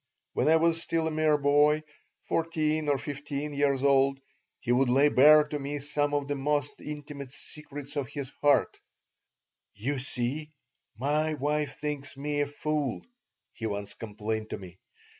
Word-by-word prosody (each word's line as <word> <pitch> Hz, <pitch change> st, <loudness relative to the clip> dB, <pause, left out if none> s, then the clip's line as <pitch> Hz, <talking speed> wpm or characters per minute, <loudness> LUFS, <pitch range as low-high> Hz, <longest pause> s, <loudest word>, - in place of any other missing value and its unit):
When -, -, +1 dB
I 160 Hz, -, +6 dB
was 165 Hz, 0 st, +3 dB
still 165 Hz, -1 st, 0 dB
a 160 Hz, -, 0 dB
mere 155 Hz, -1 st, +3 dB
boy, 145 Hz, +2 st, +4 dB, 0.4 s
fourteen 155 Hz, -2 st, 0 dB
or 140 Hz, -, +3 dB
fifteen 145 Hz, +1 st, -4 dB
years 140 Hz, -2 st, +1 dB
old, 135 Hz, -1 st, +4 dB, 0.4 s
he 120 Hz, -, -2 dB
would 125 Hz, +1 st, +3 dB
lay 140 Hz, +4 st, +5 dB
bare 150 Hz, +3 st, +7 dB
to 150 Hz, -, -3 dB
me 145 Hz, +1 st, -3 dB
some 145 Hz, 0 st, 0 dB
of 145 Hz, -1 st, -1 dB
the 145 Hz, -, 0 dB
most 145 Hz, 0 st, -1 dB
intimate 145 Hz, -2 st, -7 dB
secrets 145 Hz, 0 st, -9 dB
of 140 Hz, -3 st, -1 dB
his 140 Hz, -2 st, -6 dB
heart 145 Hz, -1 st, +3 dB, 1.0 s
"You 130 Hz, +7 st, -2 dB
see, 130 Hz, +4 st, -2 dB, 0.5 s
my 150 Hz, +5 st, +1 dB
wife 150 Hz, +1 st, -1 dB
thinks 145 Hz, -2 st, -4 dB
me 145 Hz, +1 st, -1 dB
a 145 Hz, -, +1 dB
fool," 145 Hz, -2 st, -2 dB, 0.5 s
he 115 Hz, -, -4 dB
once 100 Hz, -1 st, -4 dB
complained 110 Hz, 0 st, -4 dB
to -, -, -4 dB
me. 95 Hz, -2 st, -12 dB
145 Hz, 160 wpm, -28 LUFS, 135-150 Hz, 1.0 s, bare